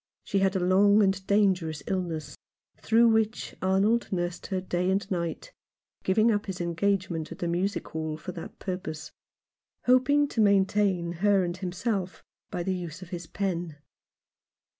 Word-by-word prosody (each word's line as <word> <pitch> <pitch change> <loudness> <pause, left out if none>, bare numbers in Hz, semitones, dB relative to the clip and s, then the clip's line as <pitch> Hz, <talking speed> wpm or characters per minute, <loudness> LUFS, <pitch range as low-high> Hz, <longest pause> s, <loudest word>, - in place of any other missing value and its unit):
She 195 - 0
had 195 0 +2
a - - +2
long 200 +4 +5
and 190 -1 0
dangerous 185 -7 +2
illness, 165 -6 -3 0.4
through 230 +1 +4
which 220 0 0
Arnold 195 +5 +2
nursed 175 -1 -2
her 190 -2 -1
day 180 0 -1
and 195 0 +1
night, 175 - -3 0.5
giving 215 +5 +3
up 205 0 -1
his 190 -1 -4
engagement 175 -1 -1
at 170 - -7
the 175 - -2
Music 180 +4 -1
Hall 155 -1 -3
for 170 +4 -7
that 170 -2 -9
purpose, 170 -4 -5 0.7
hoping 270 +4 +4
to 225 - 0
maintain 195 -3 +2
her 200 -2 +4
and 175 -1 -2
himself 185 +1 -3 0.3
by 175 - -3
the 190 +1 -1
use 175 -1 -6
of 175 - -12
his 175 -3 -6
pen. 175 -5 -3
190 Hz, 155 wpm, -27 LUFS, 175-200 Hz, 0.7 s, long